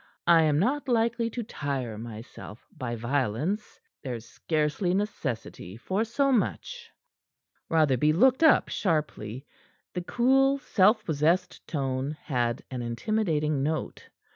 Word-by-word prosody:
"I 170 -1 +6
am 150 -2 +3
not 270 - 0
likely 230 0 +1
to 235 +1 -4
tire 135 - -4
myself 110 0 -9
by 120 -2 -4
violence. 135 - -2 0.2
There's 120 -4 -5
scarcely 155 +7 -1
necessity 130 - -4
for 190 - -1
so 275 +5 +1
much." 460 - -1 0.8
Rotherby 150 -3 +3
looked 255 - +4
up 315 -2 +5
sharply. 145 - -2 0.5
The 180 - -2
cool, 270 +7 +3
self 215 -4 +3
possessed 165 +4 0
tone 135 0 -2
had 120 -3 -1
an 125 -2 -4
intimidating 150 - 0
note. 155 +3 -3
155 Hz, 115 wpm, -27 LUFS, 130-215 Hz, 0.8 s, I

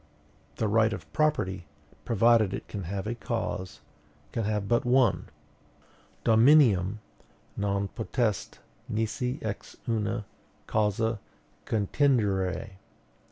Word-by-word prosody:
The 110 - 0
right 110 +1 +3
of - - -9
property, 95 - 0 0.4
provided 115 -3 +4
it - - -8
can 100 -4 -5
have 95 +3 -4
a 110 - -2
cause, 110 -5 -4 0.5
can 115 - -2
have 105 -1 -1
but 120 +1 +2
one 125 0 +2 1.0
Dominium 110 -5 +5 0.6
non 100 0 -1
potest 110 0 -2 0.3
nisi 125 +4 -1
ex 105 -2 -5
una 110 -1 -1 0.4
causa 110 +1 0 0.5
contingere. 105 -4 +1
110 Hz, 100 wpm, -28 LUFS, 100-120 Hz, 1.0 s, Dominium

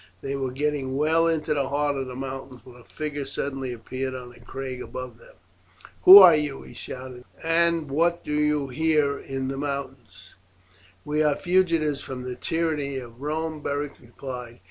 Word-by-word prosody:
They 135 0 -2
were 135 -1 -2
getting 135 0 -2
well 160 +3 +3
into 160 -2 0
the 140 -2 -1
heart 145 0 0
of 135 -1 -3
the 125 - -7
mountains 135 -1 -7
when 125 - -14
a 125 - -15
figure 145 +2 -5
suddenly 135 -2 -4
appeared 130 +3 -5
on 125 -1 -8
a - - -17
crag 130 -2 -6
above 125 -3 -7
them. - - -18 0.7
"Who 190 +2 +13
are 180 -5 +10
you?" 150 -3 -2
he - - -13
shouted, 125 -1 -8 0.2
"and 165 -1 +2
what 170 +4 +1
do 150 - -4
you 150 -2 +1
here 150 0 +1
in 135 -1 -4
the 135 - -4
mountains?" 130 -9 -6 0.7
"We 150 +1 0
are 150 -2 +3
fugitives 165 -6 +1
from 130 -2 -6
the 125 0 -4
tyranny 155 -4 -1
of 120 -1 -9
Rome," 155 +1 -3
Beric 145 0 -3
replied. 120 -1 -8
140 Hz, 175 wpm, -25 LUFS, 130-150 Hz, 0.7 s, Who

